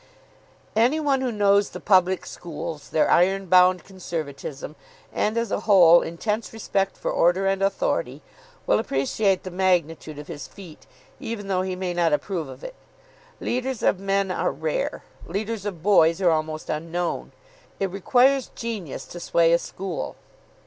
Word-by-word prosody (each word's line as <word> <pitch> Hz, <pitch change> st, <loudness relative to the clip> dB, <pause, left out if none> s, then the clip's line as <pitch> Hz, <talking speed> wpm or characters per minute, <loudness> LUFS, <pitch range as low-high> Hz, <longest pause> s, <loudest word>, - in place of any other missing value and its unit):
Any 245 Hz, +8 st, +3 dB
one 280 Hz, -3 st, +1 dB
who 255 Hz, -2 st, -1 dB
knows 200 Hz, -1 st, +3 dB
the -, -, -8 dB
public 185 Hz, -2 st, +3 dB
schools, 160 Hz, -2 st, -7 dB
their 155 Hz, -, +2 dB
ironbound 185 Hz, -1 st, +4 dB
conservatism, 155 Hz, -6 st, -6 dB, 0.4 s
and, 215 Hz, +2 st, 0 dB
as 230 Hz, -2 st, -1 dB
a -, -, 0 dB
whole, 180 Hz, -5 st, +6 dB
intense 210 Hz, +6 st, -3 dB
respect 195 Hz, -3 st, -2 dB
for -, -, -2 dB
order 175 Hz, +3 st, +2 dB
and 195 Hz, 0 st, +1 dB
authority, -, -, -1 dB, 0.4 s
will -, -, +3 dB
appreciate 190 Hz, +4 st, 0 dB
the 185 Hz, -, -6 dB
magnitude 170 Hz, -4 st, 0 dB
of 150 Hz, -, -8 dB
his 145 Hz, -, -7 dB
feat, 180 Hz, -6 st, -13 dB, 0.3 s
even 205 Hz, -3 st, -5 dB
though 185 Hz, -1 st, +1 dB
he 185 Hz, 0 st, -3 dB
may 180 Hz, -1 st, -3 dB
not 170 Hz, -3 st, +2 dB
approve 165 Hz, -1 st, -2 dB
of -, -, -11 dB
it. -, -, -7 dB, 0.7 s
Leaders 255 Hz, 0 st, -2 dB
of 185 Hz, -, +2 dB
men 195 Hz, 0 st, 0 dB
are -, -, 0 dB
rare. 155 Hz, +3 st, -3 dB, 0.2 s
Leaders 205 Hz, +3 st, -3 dB
of 175 Hz, -6 st, -6 dB
boys 170 Hz, -4 st, +4 dB
are 180 Hz, -3 st, +4 dB
almost 155 Hz, 0 st, -2 dB
unknown. 165 Hz, +3 st, -3 dB, 0.5 s
It 195 Hz, -2 st, -1 dB
requires 255 Hz, +7 st, +3 dB
genius 215 Hz, -, -5 dB
to 175 Hz, -, -9 dB
sway 170 Hz, -1 st, +3 dB
a 170 Hz, -, +4 dB
school. 185 Hz, -1 st, -5 dB
185 Hz, 155 wpm, -24 LUFS, 170-205 Hz, 0.7 s, whole